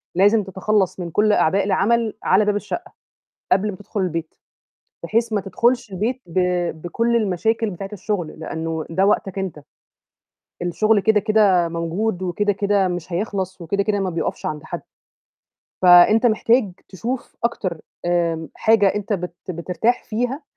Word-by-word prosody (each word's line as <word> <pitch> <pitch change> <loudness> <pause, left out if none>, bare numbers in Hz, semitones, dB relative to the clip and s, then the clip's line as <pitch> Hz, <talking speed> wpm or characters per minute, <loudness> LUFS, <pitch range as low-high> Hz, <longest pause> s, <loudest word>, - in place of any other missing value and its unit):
"لازم 205 +3 +4
تتخلّص 190 0 0
من 170 -2 -5
كل 210 +3 +3
أعباء 195 +3 +3
العمل، 220 +3 +1
على 200 +3 +4
باب 210 -1 +1
الشقّة" 345 - -5 0.6
قبل 200 +3 +3
ما 185 - -8
تدخُل 205 +1 -5
البيت، 165 -2 -3 0.7
بحيث 230 +1 0
ما 205 - +1
تدخُلش 235 +2 0
البيت 235 +7 -2
ب 175 +2 -3 0.4
بكل 230 +7 0
المشاكل 220 +2 0
بتاعة 195 +2 -7
الشغل، 190 -4 -3
لأنه 160 0 -4
ده 190 +4 +2
وقتك 195 -2 0
أنت. 180 -6 -4 1.0
الشغل 215 +5 +2
كده، 215 +1 +3
كده 200 -5 +3
موجود 175 +4 -2
وكده، 205 +3 0
كده 200 -1 +1
مش 175 -1 -5
هيخلص، 190 -1 -3
وكده، 200 +4 -1
كده 205 -1 0
ما 190 -1 -1
بيُقفش 165 -1 -3
عند 150 0 -4
حَدّ. 175 +2 -6 1.0
فأنت 180 +6 +7
محتاج 230 -2 +3 0.2
تشوف 235 +7 -5
أكتر 185 -8 -2 0.2
آمم 170 -2 0
حاجة 220 -3 +4
أنت 210 +1 -2
بت 180 -2 -4
بترتاح 180 +8 -1
فيها، 245 +6 -3
195 Hz, 145 wpm, -21 LUFS, 175-215 Hz, 1.0 s, فأنت